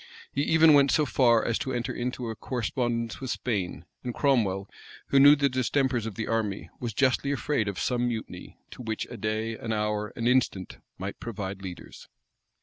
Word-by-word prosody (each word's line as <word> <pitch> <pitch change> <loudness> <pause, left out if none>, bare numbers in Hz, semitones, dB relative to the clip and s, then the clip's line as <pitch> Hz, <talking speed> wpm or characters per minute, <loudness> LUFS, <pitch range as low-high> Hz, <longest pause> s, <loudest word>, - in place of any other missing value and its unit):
He 140 - -1
even 160 +1 +6
went 140 -1 +6
so 150 - +3
far 120 -4 +3
as 115 - 0
to 130 - -3
enter 120 -1 -2
into 125 -1 -3
a - - -6
correspondence 120 0 -2
with 130 - -4
Spain, 95 - -2 0.2
and 125 -1 -4
Cromwell, 105 -9 +1 0.4
who 140 - +5
knew 145 +2 +9
the 140 -1 +2
distempers 130 -2 0
of 110 - -6
the 110 - -3
army, 110 -3 -2
was 115 -4 -4
justly 135 +2 +2
afraid 140 -4 0
of 100 - -3
some 125 -1 0
mutiny, 115 -2 -6
to - - -9
which 110 -2 -3
a - - -6
day, 110 +1 -2
an 115 0 -5
hour, 105 -1 -1
an 115 - -3
instant, 120 -7 +1 0.2
might - - -6
provide 100 -4 -5
leaders. 90 -2 -9
120 Hz, 185 wpm, -27 LUFS, 110-130 Hz, 0.4 s, knew